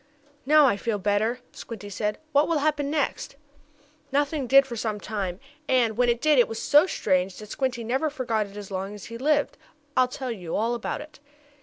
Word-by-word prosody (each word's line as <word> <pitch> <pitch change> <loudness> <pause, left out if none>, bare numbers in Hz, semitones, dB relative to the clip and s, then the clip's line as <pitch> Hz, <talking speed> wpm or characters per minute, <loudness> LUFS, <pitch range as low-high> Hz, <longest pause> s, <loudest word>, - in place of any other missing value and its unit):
"Now 305 0 +7
I 225 -7 +3
feel 215 +1 -1
better," 210 +5 0
Squinty 205 -3 -9
said. 210 +2 -2
"What 290 0 +4
will 335 - +1
happen 290 -1 0
next?" 290 -2 -2 0.8
Nothing 285 -1 0
did 275 +2 +7
for 245 -3 -6
some 215 -2 -2
time, 195 -4 -4 0.3
and, 240 -4 +3
when 245 +1 +2
it 235 -1 +1
did 305 -3 +4
it 240 - +5
was 225 - -5
so 295 +5 +5
strange 185 - 0
that 210 -1 -10
Squinty 255 -3 -2
never 265 +7 0
forgot 235 -7 -1
it 200 +1 -13
as 205 -1 -8
long 195 +2 -4
as 205 - -10
he 230 - -6
lived. 295 +2 +1 0.4
I'll 255 - +4
tell 255 0 -5
you 180 -7 -5
all 230 +3 +1
about 235 +3 -3
it. 305 -1 -13
240 Hz, 200 wpm, -26 LUFS, 210-280 Hz, 0.8 s, Now